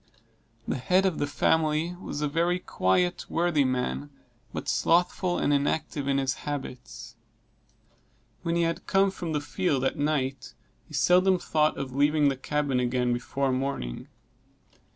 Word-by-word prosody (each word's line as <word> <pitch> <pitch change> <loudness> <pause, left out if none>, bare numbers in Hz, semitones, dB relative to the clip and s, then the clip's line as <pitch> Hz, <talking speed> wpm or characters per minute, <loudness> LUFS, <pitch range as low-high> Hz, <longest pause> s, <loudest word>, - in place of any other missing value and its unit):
The - - -1
head 180 +10 +2
of 185 -4 0
the 145 - 0
family 160 +3 +1
was 145 -4 -4
a - - +2
very 170 +4 +1
quiet, 175 - 0
worthy 170 -4 +2
man; 75 - -2 0.4
but - - -6
slothful 175 +1 +2
and 145 - +1
inactive 145 0 -1
in 140 0 +2
his 135 -1 +1
habits. 135 -4 -6 1.3
When 170 0 -1
he 170 - +2
had 165 +1 -2
come 195 0 +3
from 175 -3 -5
the 150 - +1
field 145 -3 -1
at 135 - -1
night, 135 -4 -1 0.3
he 155 - -8
seldom 180 +5 +4
thought 155 -3 +1
of 130 -2 -5
leaving 145 +1 +3
the 135 - -1
cabin 140 0 -1
again 125 0 +1
before 135 +3 -1
morning. 130 - -3
145 Hz, 150 wpm, -27 LUFS, 135-170 Hz, 1.3 s, seldom